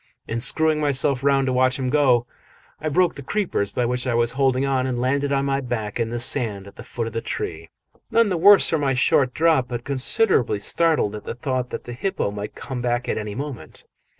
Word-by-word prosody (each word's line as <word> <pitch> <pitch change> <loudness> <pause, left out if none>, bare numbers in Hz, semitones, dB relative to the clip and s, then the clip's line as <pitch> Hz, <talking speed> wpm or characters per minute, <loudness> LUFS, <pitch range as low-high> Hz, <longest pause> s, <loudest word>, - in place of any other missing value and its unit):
In 115 - -3
screwing 155 +5 +2
myself 140 -2 0
round 140 -1 +3
to 130 - 0
watch 130 +1 +2
him 130 -2 -2
go, 130 -5 +3 0.5
I 155 - -2
broke 175 +3 +2
the 140 - -9
creepers 155 - -2
by 125 - -1
which 125 +2 -1
I 120 - 0
was 120 0 +1
holding 135 0 +1
on 130 -1 0
and 125 -2 -2
landed 140 +3 0
on 140 0 +1
my 135 0 0
back 120 -4 -4
in 115 -1 -1
the 120 +1 -3
sand 115 -6 0
at 100 - -14
the - - -10
foot 120 -1 -5
of 115 - -6
the 115 - -2
tree 80 -5 -5 0.4
none 230 -1 +3
the 185 - 0
worse 195 +4 +6
for 160 - +1
my 135 -2 0
short 130 0 +3
drop, 155 -4 +2
but 120 -1 -5
considerably 135 - +1
startled 155 -1 +1
at 105 - -7
the - - -6
thought 125 0 -3
that - - -6
the 120 - -8
hippo 190 - -2
might 105 0 -7
come 130 -3 -6
back 120 0 -1
at - - -1
any 105 -1 -6
moment. 140 -2 -7
130 Hz, 230 wpm, -22 LUFS, 120-140 Hz, 0.5 s, worse